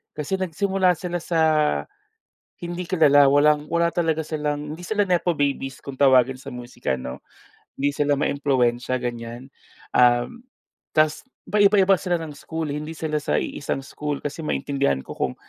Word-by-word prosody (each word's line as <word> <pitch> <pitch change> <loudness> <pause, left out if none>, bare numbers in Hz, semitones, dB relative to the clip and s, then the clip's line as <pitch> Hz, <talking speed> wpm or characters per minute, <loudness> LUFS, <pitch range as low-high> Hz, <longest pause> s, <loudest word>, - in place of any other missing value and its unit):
kasi 150 +5 -2
nagsimula 190 0 +1
sila 175 -1 -3
sa 165 -2 0 1.2
hindi 175 +1 -5
kilala, 145 -6 +5
walang 150 +1 +3
wala 170 0 +1
talaga 160 -2 0
silang, 150 -1 -3
hindi 170 - -10
sila 205 +3 0
nepo 175 -2 +1
babies 140 -1 -1
kung 140 - -6
tawagin 130 -1 +5
sa - - -8
musika 120 - -4
'no. 65 0 -7 0.6
Hindi 140 +1 0
sila 145 0 +1
maimpluwensya 130 -3 0
ganiyan, 120 +1 -6 0.4
uhm, 120 - +3 0.6
tas 155 0 +3 0.3
paiba-iba 200 -2 +5
sila 180 -2 0
ng 155 -2 -7
school, 160 -2 -4
hindi 150 +2 -5
sila 155 -1 -2
sa - - -2
iisang 140 -1 -4
school, 145 +1 -4
kasi 145 +3 -5
maintindihan 140 - 0
ko - - -15
kung 65 - -1
150 Hz, 145 wpm, -23 LUFS, 135-170 Hz, 1.2 s, kilala